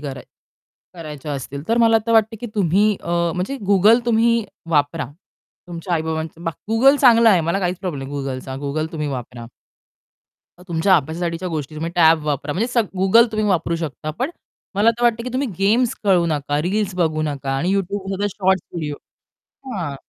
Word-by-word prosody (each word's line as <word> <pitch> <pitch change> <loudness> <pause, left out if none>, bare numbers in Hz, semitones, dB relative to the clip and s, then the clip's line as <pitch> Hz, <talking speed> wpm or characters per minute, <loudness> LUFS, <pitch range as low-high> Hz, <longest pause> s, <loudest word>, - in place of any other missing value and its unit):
कराय 135 -3 -7 0.7
करायच्या 150 -3 -7
असतील 140 +1 -6
तर 230 - +2
मला 225 -1 +5
तर 230 - +1
वाटतं, 225 0 +3
की 240 - -4
तुम्ही 205 +2 +2
अ, 170 - -6 0.2
म्हणजे 185 +10 -3
Google 215 +5 +5
तुम्ही 230 0 +3 0.3
वापरा. 150 -1 +1 0.6
तुमच्या 175 +1 -5
आई-बाबांचं 160 +1 -3
बा 165 - 0 0.2
Google 265 +6 +5
चांगलं 235 -3 +6
आहे, 190 -5 +5
मला 170 +4 0
काहीच 180 -1 -1
प्रॉब्लेम 145 -8 -5
नाही 145 - -5
Googleचा, 130 -1 -5
Google 155 +4 -3
तुम्ही 150 -2 -3
वापरा. 125 -3 -6 1.1
अ, - - -15
तुमच्या 170 +3 +3
अभ्यासासाठीच्या 165 +4 -3
गोष्टी, 155 -3 -4
तुम्ही 160 +2 -4
टॅब 160 -3 +4
वापरा 145 0 -2
म्हणजे 200 +9 0
सग 235 -3 +1
Google 225 +5 +5
तुम्ही 215 0 0
वापरू 170 -3 0
शकता 155 -1 -5
पण 260 +5 -1 0.4
मला 210 +4 +4
तर 235 +1 -6
वाटतं, 235 -1 +2
की - - -3
तुम्ही 265 +1 -1
गेम्स 225 +5 +2
खेळू 185 -4 +3
नका, 145 -2 -1
रील्स 195 +2 -1
बघू 160 -3 0
नका 145 -3 -3
आणि 175 +7 0
YouTubeमध्ये 195 +1 -2
शॉर्टस् 190 -3 0
व्हिडिओ 155 -4 -3 0.8
हां. 165 -8 -4
175 Hz, 175 wpm, -20 LUFS, 155-215 Hz, 1.1 s, चांगलं